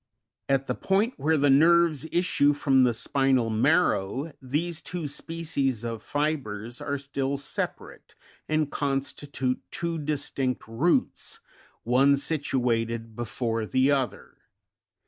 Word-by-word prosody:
At 135 0 +2
the 125 - -1
point 200 - +1
where 155 +3 +2
the 145 -1 +4
nerves 160 0 +4
issue 160 -5 +3
from 135 -3 +3
the 120 - +2
spinal 135 -2 +1
marrow, 135 - +1
these 155 +6 -2
two 175 -4 -5
species 140 -6 -2
of 115 -2 -4
fibres 125 -7 -3
are 145 -1 -2
still 140 0 -2
separate, 140 - -6 0.3
and 155 -1 +1
con 135 -2 0
stitute 135 -2 -3
two 170 -1 -3
distinct 140 -3 -2
roots, 130 +10 0 0.4
one 135 +4 +4
situated 115 -6 -1
be 120 - -3
fore 115 -1 -2
the 130 +4 +3
other 135 -3 -2
{Fig. - - -39
140 Hz, 125 wpm, -26 LUFS, 125-155 Hz, 0.4 s, the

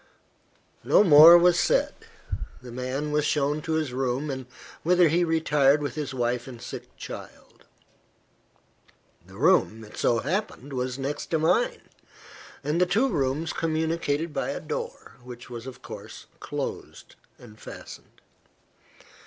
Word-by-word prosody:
No - - +5
more 165 -1 +10
was 175 0 +4
said. - - +2 0.7
The 125 -1 -11
man 130 +4 -3
was 150 0 +1
shown 150 0 0
to 160 +1 -3
his 155 -5 -1
room, 130 +1 -2 0.3
whither 175 0 +4
he 170 +3 +2
retired 150 -4 +3
with 145 -4 -4
his 150 -3 -4
wife 120 -1 -2
and 125 -3 -9
sick - - -9
child. - - -11 1.6
The 95 - -15
room, 130 - +3
it 105 - -13
so 120 - +2
happened, 155 - -3
was 125 0 -2
next 140 +2 -4
to 165 - 0
mine, 475 - +1 0.8
and 150 +5 0
the 180 - +4
two 225 +9 +2
rooms 150 - -1
communicated 160 -1 -1
by - - -2
a - - -3
door, 480 +1 -6
which 125 0 -11
was 120 +1 -7
of 130 -1 -10
course 110 -4 -10
closed - - -6 0.2
and 110 -3 -15
fastened. - - -12
145 Hz, 135 wpm, -26 LUFS, 125-165 Hz, 1.6 s, more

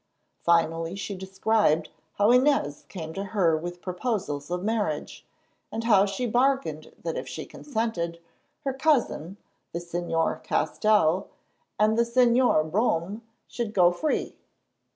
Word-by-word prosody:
Finally 165 0 +2
she 200 +1 -4
described 190 -4 +1 0.3
how 205 +3 +4
Inez 250 - +2
came 160 -4 -6
to 195 - -4
her 185 -5 +2
with 175 +2 -6
proposals 180 - -3
of 180 +1 -2
marriage, 205 -9 -2 0.4
and 225 +1 -3
how 205 -4 +5
she 195 +6 -2
bargained 265 +4 0
that - - -2
if - - -5
she - - -6
consented, 220 - -3 0.4
her 270 - -1
cousin, 260 - +1 0.4
the 170 - -2
Señor 170 -1 -1
Castell, 200 -5 +2 0.5
and 215 +2 +3
the - - +6
Señor 235 -9 +3
Brome 200 0 0 0.3
should 230 -3 -4
go 180 -2 +6
free. 305 - -1
195 Hz, 130 wpm, -26 LUFS, 170-230 Hz, 0.5 s, the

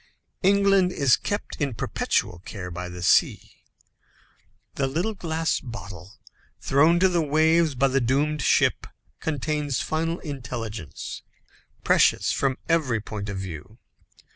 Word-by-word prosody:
England 195 -1 +4
is 140 -7 +3
kept 205 +1 -4
in 140 -5 -1
perpetual 90 -4 -1
care 90 0 -8
by 90 +1 -6
the 90 0 -8
sea. - - +2 1.2
The 135 - -1
little 170 +11 -1
glass 165 -4 -1
bottle 100 -6 -9 0.5
thrown 155 +5 +3
to 190 - +6
the 175 -2 +1
waves 160 +1 +3
by 135 +2 +2
the 135 +1 +1
doomed 145 +5 +1
ship, - - +2 0.3
contains 150 -2 -2
final 165 +2 -1
intelligence, 120 - -6 0.6
precious - - +3
from 135 -1 0
every 150 -9 +1
point 105 -1 -6
of 100 - -4
view. 95 +3 -8
140 Hz, 125 wpm, -25 LUFS, 110-160 Hz, 1.2 s, to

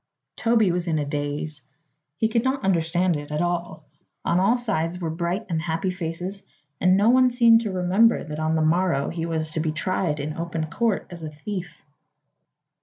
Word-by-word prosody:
Toby 225 -5 +3
was 175 0 -2
in 160 -2 +1
a 150 - -1
daze. 145 +1 -4 0.6
He 220 - +2
could 225 +1 0
not 265 +1 -1
understand 175 -1 +1
it 145 0 -8
at 150 0 -2
all. 175 0 -3 0.4
On 175 - +2
all 225 +6 +3
sides 180 -8 -1
were 170 -3 -3
bright 175 +5 -2
and 165 -3 -1
happy 165 +2 -1
faces 180 +2 -5 0.4
and 185 +1 +4
no 205 +3 +4
one 255 0 +5
seemed 235 -2 +5
to 215 -3 -3
remember 190 +5 +3
that 150 0 -6
on 155 +1 0
the 160 -1 +2
morrow 170 -3 +1
he 165 -1 -3
was 160 -1 -1
to 160 - -1
be 155 0 0
tried 155 -1 -1
in 150 +2 -4
open 165 -2 -3
court 225 +1 0
as 170 -1 -8
a 155 - -5
thief. 175 +4 -6
175 Hz, 190 wpm, -24 LUFS, 160-195 Hz, 0.6 s, one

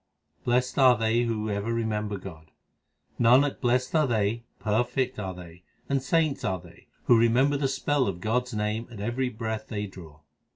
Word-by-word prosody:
Blest 125 +2 +1
are 130 -3 +6
they 115 +1 +1
who 110 -2 -2
ever 100 +3 -2
remember 105 -3 -2
God: 80 -4 -11 0.7
Nanak, 130 +4 +4
blest 125 0 +1
are 155 -3 +3
they, 115 0 0
perfect 120 +3 -1
are 95 -3 -4
they, 90 -1 -12 0.3
and 140 -1 0
saints 155 +1 +1
are 95 -1 -1
they, 85 -1 -17 0.2
Who 120 - +5
remember 125 +5 +3
the 140 -1 +1
spell 135 0 0
of 90 -3 -3
God 115 +5 0
s 125 - -9
name 105 +2 -2
at 115 -4 -10
every 120 +5 -1
breath 110 -1 -4
they 105 -2 -3
draw. 85 -6 -12
115 Hz, 175 wpm, -27 LUFS, 105-125 Hz, 0.7 s, are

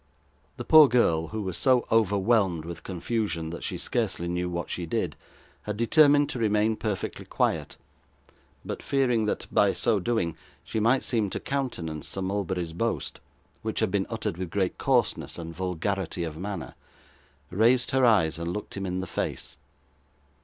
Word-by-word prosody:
The - - -6
poor 155 -2 +9
girl, 85 -11 +2
who 110 +4 -4
was 95 -3 -3
so 130 -3 +3
overwhelmed 100 -5 +2
with 85 0 -7
confusion 85 -3 -2
that 85 - -7
she - - -3
scarcely 85 - -2
knew 90 +1 -1
what 85 0 -3
she 85 -2 -4
did, 90 -6 -1 0.5
had 105 -1 -4
determined 145 +4 +5
to 125 - -4
remain 110 0 +2
perfectly 105 -3 -3
quiet; - - -1 0.9
but - - -5
fearing 125 -5 +1
that 105 - -2
by - - +4
so 110 - +1
doing 90 -5 -1 0.3
she 110 - -3
might 120 +5 +3
seem 110 -5 0
to - - -3
countenance 90 - -3
Sir 95 - -4
Mulberry's 95 -3 -2
boast, 115 +7 -2 0.4
which 110 0 -3
had 110 -4 +1
been 100 -1 0
uttered 110 -7 -3
with 90 -2 -4
great 95 0 -1
coarseness - - +1
and 85 -1 -7
vulgarity 90 0 -2
of 80 -2 -4
manner, 95 0 -5 0.8
raised 120 +8 +3
her 130 -1 +2
eyes, 95 -10 +4
and 85 +1 -3
looked 105 +3 -6
him 100 -1 -3
in 90 0 -2
the - - -4
face. - - -4
100 Hz, 165 wpm, -27 LUFS, 85-115 Hz, 0.9 s, poor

